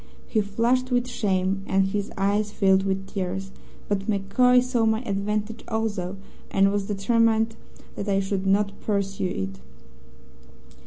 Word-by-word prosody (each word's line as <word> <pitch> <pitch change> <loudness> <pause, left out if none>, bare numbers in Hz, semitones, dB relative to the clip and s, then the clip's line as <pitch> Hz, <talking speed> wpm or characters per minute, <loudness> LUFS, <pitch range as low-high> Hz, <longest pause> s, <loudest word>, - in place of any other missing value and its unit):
He 220 - +1
flushed 235 +5 +1
with 245 -1 +1
shame, 195 -4 0
and 190 0 +2
his 205 +1 -2
eyes 205 +2 +1
filled 190 -2 +3
with 195 0 -1
tears. 190 0 -4 0.4
But 200 0 -1
MacCoy 215 +5 +4
saw 250 -2 0
my 220 +2 +1
advantage 210 +1 -2
also, 205 -4 -2 0.3
and 195 0 +3
was 200 -1 -1
determined 225 +2 +2 0.4
that 200 - -4
I 195 0 +3
should 195 0 -2
not 200 +1 +3
pursue 195 -2 -1
it. 95 - -4
200 Hz, 140 wpm, -25 LUFS, 195-220 Hz, 0.4 s, MacCoy